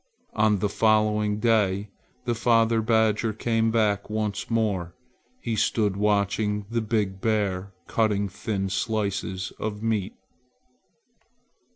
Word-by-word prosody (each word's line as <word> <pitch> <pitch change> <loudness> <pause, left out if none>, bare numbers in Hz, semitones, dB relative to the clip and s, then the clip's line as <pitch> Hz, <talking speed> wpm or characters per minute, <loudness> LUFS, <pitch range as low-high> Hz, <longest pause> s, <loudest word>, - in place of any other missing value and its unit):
On 105 -1 +3
the 105 - 0
following 105 0 +2
day 105 -3 +1 0.3
the 120 - +1
father 115 -1 +3
badger 110 0 +2
came 115 +1 +1
back 105 -3 +1
once 105 -1 -2
more. 100 -7 -1 0.4
He 115 - -2
stood 105 -2 +1
watching 105 0 0
the 115 0 0
big 105 -4 -1
bear 100 -3 0
cutting 105 -3 +1
thin 95 0 -3
slices 100 -3 -2
of 105 0 -4
meat. 110 -4 -1
105 Hz, 110 wpm, -25 LUFS, 100-110 Hz, 0.4 s, On